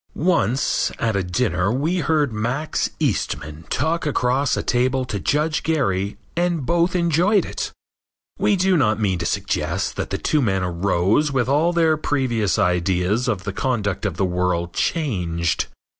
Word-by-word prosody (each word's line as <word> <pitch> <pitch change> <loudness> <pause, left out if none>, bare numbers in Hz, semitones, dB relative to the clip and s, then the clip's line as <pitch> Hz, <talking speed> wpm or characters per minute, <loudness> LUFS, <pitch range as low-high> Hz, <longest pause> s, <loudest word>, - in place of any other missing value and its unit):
Once, 145 - +1
at 110 -3 0
a 100 - +1
dinner 95 0 0
we 150 +9 0
heard 150 -5 +1
Max 120 +8 -1
Eastman 75 +2 -2
talk 165 +2 0
across 135 -2 +1
a - - -2
table 130 +1 +1
to 105 -5 -4
Judge 150 +7 0
Gary 100 - 0 0.2
and 170 -4 0
both 170 +3 +1
enjoyed 175 +4 +3
it. - - -4 0.7
We 205 - +3
do 190 0 +2
not 110 -7 +2
mean 95 -5 0
to 85 - -1
suggest - - -2
that - - -3
the - - -2
two 150 - +1
men 95 -6 +1
arose 95 - +1
with 130 -3 0
all 150 +6 +3
their 165 -2 +3
previous 120 - 0
ideas 90 +6 +1
of 100 -6 -1
the 100 -1 -4
conduct 105 -5 -1
of - - -5
the 95 - +1
world 90 -1 -1
changed. 85 - -1
125 Hz, 160 wpm, -22 LUFS, 95-155 Hz, 0.7 s, enjoyed